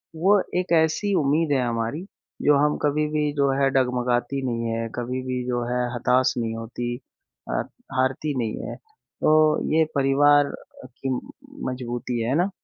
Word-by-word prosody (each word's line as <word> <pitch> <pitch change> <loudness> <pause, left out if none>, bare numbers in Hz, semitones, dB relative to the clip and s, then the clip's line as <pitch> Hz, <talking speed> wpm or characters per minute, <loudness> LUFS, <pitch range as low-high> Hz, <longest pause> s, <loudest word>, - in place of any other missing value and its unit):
वो 195 +5 +4 0.2
एक 180 - -4
ऐसी 200 +6 0
उम्मीद 150 +2 +1
है 130 - +2
हमारी 115 +9 -2 0.4
जो 145 -1 +5
हम 150 - +1
कभी 150 +1 +1
भी 150 -1 0
जो 140 -2 +2
है 135 - +4
डगमगाती 125 0 0
नहीं 115 -2 -2
है, 115 0 -2
कभी 125 +1 -3
भी 125 -1 -3
जो 120 -1 -1
है 125 0 +1
हताश 130 +2 +2
नहीं 115 -1 -2
होती 120 +1 -4 0.5
अ, - - 0 0.4
हारती 135 +2 0
नहीं 110 -2 -2
है। - - -6
तो 435 - -2 0.4
ये 160 0 +5
परिवार 145 +1 +4 0.3
की 130 +1 -6 0.6
मज़बूती 120 -1 -3
है, 115 - -1
है 135 - +1
ना? 180 +4 +2
130 Hz, 160 wpm, -24 LUFS, 120-150 Hz, 0.6 s, जो